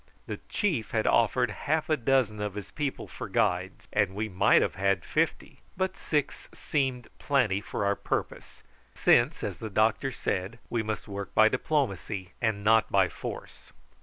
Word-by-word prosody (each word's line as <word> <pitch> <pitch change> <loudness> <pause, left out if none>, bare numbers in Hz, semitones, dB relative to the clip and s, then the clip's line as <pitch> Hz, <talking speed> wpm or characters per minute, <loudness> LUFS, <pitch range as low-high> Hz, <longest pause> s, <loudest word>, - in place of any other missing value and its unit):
The - - -5
chief 155 - 0
had 110 -1 0
offered 120 0 +3
half 155 +8 -1
a 155 - +3
dozen 120 -5 +1
of 105 -1 -3
his 105 -2 -7
people 145 -3 -3
for - - -7
guides, - - 0
and 95 - +1
we 110 +2 -1
might 95 -3 +4
have - - -1
had 100 +1 0
fifty; - - -1 0.2
but 190 0 -1
six 150 -3 -2
seemed 130 -5 -1
plenty 115 -9 +1
for 100 - -3
our 100 0 +2
purpose, - - -4 0.3
since, - - +3
as - - -4
the 110 - -5
doctor 110 +6 +2
said, 95 -2 -3
we 115 - +1
must 110 -1 -4
work 100 -2 -6
by 110 0 +7
diplomacy 100 - -1
and 110 -3 0
not 110 +1 +4
by 95 -2 +4
force. - - -8
110 Hz, 165 wpm, -28 LUFS, 100-135 Hz, 0.3 s, by